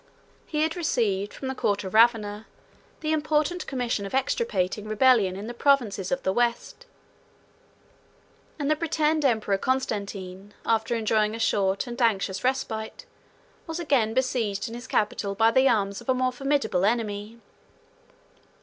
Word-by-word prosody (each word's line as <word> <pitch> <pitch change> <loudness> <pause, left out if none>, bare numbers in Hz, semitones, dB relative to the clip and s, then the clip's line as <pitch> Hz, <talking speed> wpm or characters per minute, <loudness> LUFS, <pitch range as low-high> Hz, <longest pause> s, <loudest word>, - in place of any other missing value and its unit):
He 305 -1 0
had 320 +1 -1
received 215 - 0
from 265 - -7
the 265 - -2
court 205 -5 -1
of 190 - -6
Ravenna 220 -2 +3 0.5
the 310 - -1
important 310 +3 0
commission 245 -6 -2
of 195 +5 -4
extirpating 215 -7 -1
rebellion 215 -4 +3
in 200 +2 -6
the 240 - -6
provinces 235 -8 +1
of 270 0 -1
the 190 - +1
West; 240 +1 -1 1.7
and 290 -1 -1
the - - +4
pretended 310 -2 +1
emperor 210 -4 0
Constantine, 200 -6 -3
after 225 +1 +1
enjoying 215 -1 +1
a - - -7
short 195 -2 +1
and 240 0 -6
anxious 200 -4 +1
respite, 250 - -2 0.6
was 325 +1 -4
again 255 -9 +1
besieged 235 -6 0
in 225 - -8
his 240 +2 -8
capital 205 -3 -1
by 225 +2 +4
the 260 +3 +4
arms 200 -4 0
of - - -11
a 260 - +4
more 255 0 +1
formidable 265 -8 0
enemy. 215 0 -1
230 Hz, 150 wpm, -26 LUFS, 205-265 Hz, 1.7 s, the